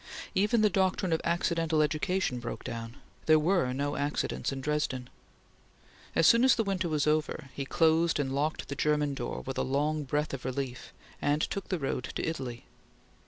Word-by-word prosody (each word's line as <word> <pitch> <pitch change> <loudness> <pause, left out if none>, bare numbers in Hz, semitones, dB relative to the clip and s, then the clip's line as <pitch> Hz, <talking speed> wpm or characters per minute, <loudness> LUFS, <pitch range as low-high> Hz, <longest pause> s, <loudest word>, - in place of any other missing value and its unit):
Even 210 +3 +3
the 210 - +5
doctrine 190 -1 +1
of 160 - +1
accidental 165 -2 +1
education 155 -2 0
broke 120 -1 -6
down. 115 0 -6 0.3
There 155 0 +7
were 160 -4 +2
no 140 +2 -1
accidents 145 0 -1
in 135 - -4
Dresden. 135 -3 -2 1.0
As - - +4
soon 230 +7 +6
as 260 - +6
the 225 - +1
winter 190 -4 -1
was 150 -3 +1
over, 155 -2 0
he 140 - -4
closed 165 +2 +3
and 135 -2 -1
locked 150 +3 -1
the 140 - -4
German 150 0 +1
door - - -4
with 135 - -4
a - - +2
long 150 +3 0
breath 150 +2 -1
of 135 - -5
relief, 130 -1 -4 0.3
and 145 +1 +2
took 200 - -3
the 185 - 0
road 135 -4 -2
to - - -2
Italy. 130 -7 -4
150 Hz, 180 wpm, -30 LUFS, 135-170 Hz, 1.0 s, There